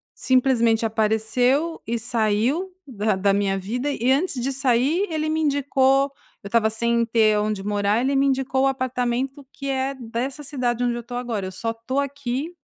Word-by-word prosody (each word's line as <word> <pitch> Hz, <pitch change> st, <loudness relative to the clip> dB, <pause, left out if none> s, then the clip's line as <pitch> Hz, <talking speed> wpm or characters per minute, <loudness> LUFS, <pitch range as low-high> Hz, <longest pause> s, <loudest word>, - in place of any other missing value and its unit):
simplesmente 240 Hz, -3 st, +2 dB
apareceu 225 Hz, +8 st, +1 dB
e 235 Hz, 0 st, -1 dB
saiu 235 Hz, -, 0 dB, 0.2 s
da 215 Hz, -4 st, 0 dB
da 195 Hz, +1 st, +2 dB
minha 195 Hz, -1 st, +1 dB
vida. 245 Hz, +9 st, -3 dB
E, 250 Hz, -2 st, -1 dB
antes 275 Hz, -2 st, +1 dB
de 270 Hz, +2 st, -1 dB
sair, 275 Hz, -, +2 dB
ele 310 Hz, -1 st, -1 dB
me 315 Hz, 0 st, 0 dB
indicou 275 Hz, -2 st, +2 dB, 0.3 s
eu -, -, -6 dB
estava 220 Hz, 0 st, +3 dB
sem 235 Hz, +1 st, +1 dB
ter 220 Hz, -2 st, +3 dB
onde 210 Hz, -1 st, -1 dB
morar; 205 Hz, +1 st, +1 dB
ele 270 Hz, +2 st, +1 dB
me 275 Hz, +1 st, +3 dB
indicou 265 Hz, 0 st, +1 dB
o -, -, +4 dB
apartamento 255 Hz, +1 st, -2 dB
que 275 Hz, 0 st, -6 dB
é 270 Hz, 0 st, -1 dB
dessa 255 Hz, +4 st, -4 dB
cidade 250 Hz, -4 st, -2 dB
onde 245 Hz, -1 st, +1 dB
eu 240 Hz, -, -4 dB
estou 245 Hz, +1 st, -7 dB
agora. 230 Hz, -6 st, -3 dB
Eu -, -, -6 dB
só 225 Hz, +5 st, -3 dB
estou 230 Hz, +4 st, -3 dB
aqui 280 Hz, +2 st, -3 dB
245 Hz, 180 wpm, -23 LUFS, 225-275 Hz, 0.3 s, o